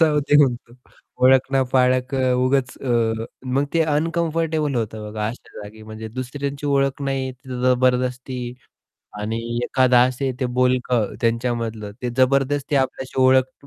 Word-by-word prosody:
जाऊ 155 -2 +4
दे 145 +1 +3
म्हणतो. 120 -3 -2 0.5
ओळख 130 0 +5
ना 135 -1 +3
पाळक 130 +1 +2
अ, 130 -1 +2
उगाच 130 0 +1
अ, 115 -3 0 0.3
मग 140 +2 +2
ते 165 - +3
अनकम्फर्टेबल 160 -1 0
होतं 110 -2 -3
बघा 105 0 -3
अशा 120 - -10
जागी. 105 +1 -11
म्हणजे 110 +1 -8
दुसऱ्यांची 140 +4 -5
ओळख 140 0 +1
नाही 135 -1 -2
तिथे 125 0 -8
जबरदस्ती 125 0 +1 0.8
आणि 110 +2 -2 0.3
एखादं 130 -1 +3
असे 130 +1 -2
ते 130 - +1
बोलकं 125 -3 +1
त्यांच्यामधलं, 115 -2 -1
ते 125 - -1
जबरदस्ती 140 +2 +2
आपल्याशी 130 0 -1
ओळख 130 +1 +2
130 Hz, 140 wpm, -21 LUFS, 120-140 Hz, 0.8 s, ओळख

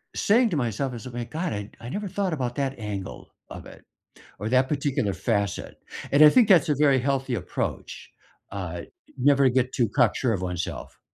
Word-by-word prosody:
saying 230 +3 +3
to 165 - 0
myself 125 +1 -2
as 120 0 -8
if, 125 - -8
"My 120 0 -4
God, 160 +8 -3
I 100 0 -5
I 120 - -7
never 205 +8 -4
thought 195 -1 -2
about 125 -5 -3
that 135 -2 -2
angle 100 -3 -6 0.2
of - - -9
it, - - -14 0.6
or 105 - -2
that 130 +1 +3
particular 135 -8 -1
facet," 100 +1 -2 0.4
and 140 +2 +5
I 155 - +11
think 240 +7 +5
that's 175 -8 +5
a 150 - +3
very 140 -3 +4
healthy 135 -1 -1
approach, 90 - -5 0.4
uh, 90 -3 -5 0.4
never 140 +1 +4
get 130 0 0
too 120 -4 +1
cock - - +4
sure 125 -3 0
of 95 - -4
oneself. 90 -1 -5
130 Hz, 195 wpm, -25 LUFS, 105-145 Hz, 0.6 s, I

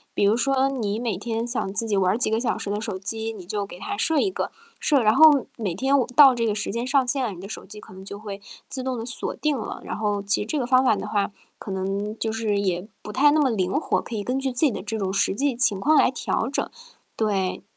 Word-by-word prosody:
比 - - +1
如 210 +3 +4
说 270 +2 +2
你 225 -5 -2
每 230 -5 -1
天 225 +2 -3
想 235 -5 -2
自 225 +2 -1
己 210 -2 0
玩 185 -1 +3
儿 - - 0
几 235 - 0
个 220 - +2
小 245 - -1
时 200 - -4
的 210 +1 -2
手 210 -4 -4
机， 220 +3 -3
你 195 -5 -10
就 200 +1 -2
给 175 - -10
它 405 - -4
设 320 -6 +1
一 385 - +1
个， - - -3 0.3
设 280 -6 +3
然 215 +1 +5
后 295 -2 +7
每 195 -7 -2
天 270 +6 +2
我 250 - 0
到 275 -3 +9
这 230 -2 0
个 210 - 0
时 205 - -2
间 235 +3 -2
上 270 -1 +2
线 265 +1 0
了， 225 - -1
你 175 - -9
的 195 - -8
手 - - -7
机 210 0 -11
可 190 - -14
能 190 0 -11
就 200 +1 -7
会 205 -1 -8 0.3
自 260 - -5
动 255 -1 -2
地 225 - -5
锁 240 - -4
定 300 -2 0
了。 225 - -5
然 - - -5
后 205 -2 -1
其 205 +1 +1
实 210 - -4
这 305 - -1
个 245 - -1
方 255 0 +5
法 220 - +4
的 205 - -5
话， 205 -1 0 0.3
可 200 - -8
能 195 +3 -3
就 220 - -1
是 220 -2 0
也 185 0 -1
不 210 - -8
太 290 +3 +5
那 310 - +3
么 275 -3 +3
灵 190 -5 0
活， 290 - +1
可 235 - -9
以 205 - -2
根 255 +4 -1
据 270 -1 -1
自 245 - -6
己 270 - +3
的 190 - -5
这 220 +1 -3
种 190 -1 -2
实 200 -1 +2
际 275 +2 0
情 215 -5 +2
况 305 +8 +3
来 - - +5
调 250 -1 -1
整。 - - -2 0.5
对。 195 -4 -1
220 Hz, 305 characters per minute, -24 LUFS, 200-260 Hz, 0.5 s, 到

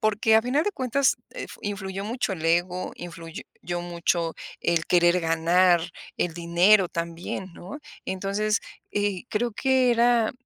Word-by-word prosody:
porque 220 +1 +3
a 225 - +4
final 260 +6 +1
de 415 - -1
cuentas, 265 -1 +1
eh, - - -6
f - - -11
influyó 195 -1 -4
mucho 220 -3 -2
el 160 -2 -8
ego, 175 +2 0
influyó 170 -2 -8 0.2
yo 175 0 -3
mucho 170 -1 -1 0.3
el 165 -1 +1
querer 175 0 +4
ganar, 170 +2 +3 0.4
el 170 -2 -1
dinero 175 +3 +4
también, 170 +2 -5
¿no? 190 +11 -9 0.3
Entonces, 200 +2 -1 0.3
eh, 205 -2 -1
creo 235 +2 -1
que 260 +2 +2
era, 235 -1 +3
190 Hz, 150 wpm, -25 LUFS, 175-220 Hz, 0.4 s, a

